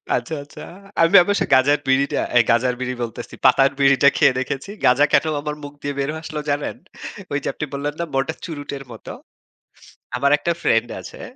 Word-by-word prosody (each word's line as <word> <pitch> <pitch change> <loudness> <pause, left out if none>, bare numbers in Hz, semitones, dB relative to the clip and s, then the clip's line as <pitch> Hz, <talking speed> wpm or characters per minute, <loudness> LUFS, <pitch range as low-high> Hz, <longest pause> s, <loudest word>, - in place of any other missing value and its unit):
আচ্ছা, 120 +6 -3
আচ্ছা। 145 - -13 0.4
আমি 165 +4 +4
অবশ্য 205 +3 0
গাঁজার 135 +3 +4
বিড়িটা, 135 +1 +2 0.2
আই 120 - +8
গাঁজার 125 +2 +2
বিড়ি 130 0 -3
বলতেছি। 115 -3 -7
পাতার 135 0 +5
বিড়িটা 140 0 +5
খেয়ে 140 -4 +4
দেখেছি। 135 +6 -4 0.2
গাঁজা 130 +4 +5
কেন - - +4 0.2
আমার 150 0 -4
মুখ 145 0 -8
দিয়ে 145 0 -3
বের 140 +1 -1
হয়ে 160 - -6
আসলো 155 -1 -5
জানেন? 145 0 -2 0.6
ঐ - - -3
যে - - -4
আপনি - - -4
বললেন 145 +1 -3
না 170 - -1
মোটা 135 +4 0
চুরুটের 145 -4 -6
মত। 115 - -12 1.1
আমার 140 +3 +2
একটা 170 - -1
ফ্রেন্ড 115 +1 +2
আছে। - - -11
140 Hz, 185 wpm, -21 LUFS, 130-150 Hz, 1.1 s, আই